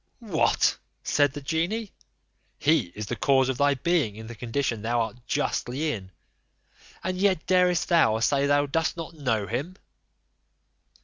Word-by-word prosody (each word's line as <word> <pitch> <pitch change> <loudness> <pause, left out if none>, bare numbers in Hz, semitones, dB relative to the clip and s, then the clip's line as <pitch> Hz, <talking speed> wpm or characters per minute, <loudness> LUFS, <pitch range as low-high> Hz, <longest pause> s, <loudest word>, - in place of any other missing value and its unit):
"What!" 155 - +2 0.2
said 145 -2 +2
the 145 - -6
genie, 170 +9 -2 0.7
"he 155 - +2
is 105 - -4
the 120 - -3
cause 130 +3 +3
of 130 - -2
thy 145 0 +3
being 145 -7 0
in 110 +1 -9
the 115 - -8
condition 115 0 -2
thou 120 +2 0
art 115 +1 -3
justly 145 +6 -1
in; 95 -6 -7 0.9
and 185 0 -2
yet 190 -4 +2
darest 180 -2 +3
thou 160 -11 +4
say 140 +4 +2
thou 145 0 +3
cost 165 +4 -1
not 165 +1 -6
know 125 -9 -1
him?" 140 - -4
140 Hz, 150 wpm, -26 LUFS, 120-165 Hz, 0.9 s, thou